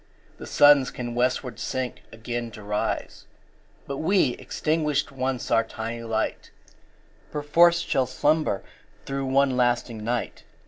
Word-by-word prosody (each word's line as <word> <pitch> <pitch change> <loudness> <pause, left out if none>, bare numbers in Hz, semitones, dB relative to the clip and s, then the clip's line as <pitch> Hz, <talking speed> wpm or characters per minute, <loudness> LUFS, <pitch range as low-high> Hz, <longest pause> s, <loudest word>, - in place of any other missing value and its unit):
The - - -8
Suns 145 -2 +6
can 120 -1 -5
westward 125 -1 -1
sink 130 +2 -3
again 120 +1 -4
to 105 - -10
rise 105 +1 -3 0.6
But 140 - -5
we, 180 -1 +3
extinguished 150 -2 -1
once 130 -1 -3
our 115 -1 +4
tiny 115 +1 -6
light, 115 -1 -2 0.8
5 - - -29
Perforce 170 +4 +4
shall 130 -2 0
slumber 150 -4 +1 0.4
through 135 0 -3
one 135 0 +3
lasting 120 -3 0
night! 120 +2 -3
130 Hz, 130 wpm, -25 LUFS, 115-145 Hz, 0.8 s, Suns